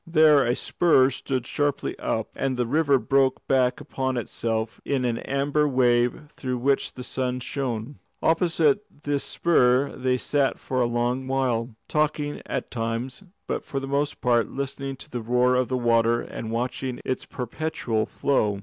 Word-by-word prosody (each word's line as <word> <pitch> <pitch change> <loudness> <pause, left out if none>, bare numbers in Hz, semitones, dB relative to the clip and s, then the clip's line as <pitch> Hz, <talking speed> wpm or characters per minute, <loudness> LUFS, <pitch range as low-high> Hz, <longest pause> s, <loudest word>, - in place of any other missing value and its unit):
There 155 -5 +5
a 120 - +2
spur 135 -6 +3
stood 130 -1 -3
sharply 145 +1 -1
up, 110 -1 -2
and 135 -2 -1
the 125 - +1
river 140 +2 +3
broke 135 0 +1
back 130 -2 +2
upon 130 -1 -2
itself 110 -1 -3
in 135 -3 0
an 115 -1 0
amber 145 +2 +1
wave 125 -1 +2
through 130 -2 -3
which 135 +3 +1
the 125 - -7
sun 125 0 -2
shone. 125 -1 -4 0.2
Opposite 165 +1 +3 0.2
this 145 -1 0
spur 135 -5 +2
they 130 -1 +1
sat 140 +1 +1
for 130 -1 -2
a 120 - +3
long 120 +2 -1
while, 125 -3 0
talking 150 -1 0
at - - -3
times, 115 - -3 0.2
but - - -3
for 135 - -3
the 135 - -5
most 140 +1 -1
part 120 -2 +2
listening 135 0 -4
to - - -12
the 120 - -3
roar 125 +2 +2
of 125 -1 +2
the 130 - -1
water 115 -1 +3
and 110 - -6
watching 125 +2 -3
its 130 - -2
perpetual 125 -3 -2
flow. 105 -8 0
130 Hz, 165 wpm, -25 LUFS, 120-140 Hz, 0.2 s, There